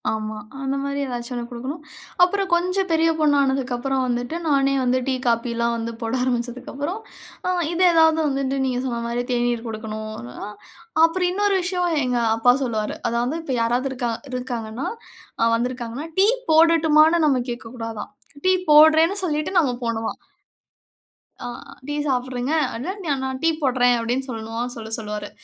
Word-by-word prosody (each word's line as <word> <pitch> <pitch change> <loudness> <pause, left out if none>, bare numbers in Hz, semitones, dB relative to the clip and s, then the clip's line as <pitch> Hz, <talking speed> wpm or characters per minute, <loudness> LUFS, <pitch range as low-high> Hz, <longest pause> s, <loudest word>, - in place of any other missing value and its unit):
ஆமா. 215 0 -3 0.2
அந்த 270 0 -1
மாரி 280 0 -2
ஏதாச்சும் 245 0 -5
ஒண்ணு 240 -1 -4
குடுக்கணும். 260 +7 -6 0.4
அப்புறம் 390 +2 +2
கொஞ்சம் 365 +2 +1
பெரிய 325 0 +3
பொண்ணு 300 -2 +4
ஆனதுக்கு 265 -2 0
அப்புறம் 265 +1 -1
வந்துட்டு, 245 +4 -2
நானே 275 -2 +3
வந்து 255 +1 +2
டீ, 265 - +1
காப்பிலாம் 235 0 +1
வந்து 230 0 -3
போட 225 +1 -2
ஆரம்பிச்சதுக்கு 245 0 -2
அப்புறம், 295 +9 -3 0.5
அ, - - +2 0.2
இத 340 - -3
எதாவது 320 -1 +5
வந்துட்டு 275 0 -1
நீங்க 250 -1 -1
சொன்ன 235 -2 -2
மாரி 240 +1 -1
தேநீர் 240 -1 0
குடுக்கணும் 215 -1 -5
அப்டின்னா. 120 +10 -8 0.6
அப்புறம் 355 +2 +3
இன்னொரு 405 +1 +1
விஷயம் 355 -3 0
எங்க 250 -1 0 0.2
அப்பா 245 +2 +5
சொல்லுவாரு 220 -4 -2
அதாவது 240 +5 -1
இப்ப 275 - -3
யாராவது 240 +3 +1
இருக்காங் 240 -3 -2
இருக்காங்கன்னா 245 -1 -4 0.7
வந்திருக்காங்கன்னா, 245 +4 -3
டீ 390 +2 +6 0.2
போடட்டுமானு 320 0 +5
நாம 270 -4 +3
கேக்கக் 240 0 -6
கூடாதாம். 225 -2 -6 0.3
டீ 370 - +4 0.2
போடறேன்னு 315 +5 +7
சொல்லிட்டு 310 +2 -1
நாம 265 -7 +1
போணுமாம். 225 -1 -2 1.2
ஆ, - - -5 0.4
டீ 290 - -2
சாப்புடுறீங்க, 255 +1 -1 0.2
அதான் 375 - -5 0.2
நான் 265 0 -3
டீ 330 - +5
போடறேன் 245 -3 +3
அப்டின்னு 245 +4 -2
சொல்லணுமாம், 230 +1 -4
சொல்லச் 225 -1 -5
சொல்லுவாரு. 210 -1 -5
255 Hz, 150 wpm, -22 LUFS, 235-310 Hz, 1.2 s, போடறேன்னு